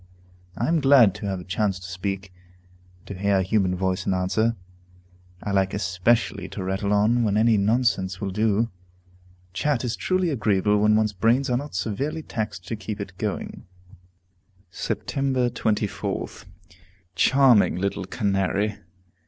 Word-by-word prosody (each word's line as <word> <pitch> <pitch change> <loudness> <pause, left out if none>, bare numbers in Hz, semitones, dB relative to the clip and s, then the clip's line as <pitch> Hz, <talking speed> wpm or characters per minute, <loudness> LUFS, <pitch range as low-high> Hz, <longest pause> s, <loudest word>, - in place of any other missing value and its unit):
I 120 - 0
am 165 0 +2
glad 135 -8 +6
to 105 - -6
have 95 -2 -2
a - - -8
chance 95 +1 -1
to 90 - -11
speak, 95 +1 -4 0.6
and 90 - -29
to - - -5
hear 100 +1 +1
a 95 - +2
human 95 -1 +1
voice 95 0 -2
in 95 - +2
answer. 110 +5 +1 0.9
I 100 - -3
like 95 -1 +1
especially 100 +1 0
to 95 - -6
rattle 95 +2 -2
on 110 +4 +3
when 105 -2 +1
any 115 +1 +4
nonsense 100 -4 +1
will 100 -2 -3
do. 110 +3 +1 0.8
Chat 135 +6 0
is 120 - -1
truly 185 -2 0
agreeable 105 -4 +2
when 105 +1 +4
one's 110 -1 +1
brains 120 +7 +2
are 120 - +2
not 145 -2 -6
severely 130 - -2
taxed 100 -9 -5
to 115 - -2
keep 110 -1 -6
it 100 -2 -7
going." 105 -3 -4 1.1
Sept. - - -3 0.5
24th. 105 -1 -2 0.7
Charming 125 +3 +4
little 100 +1 -2
Canary! 100 0 -1
105 Hz, 150 wpm, -24 LUFS, 95-115 Hz, 1.1 s, glad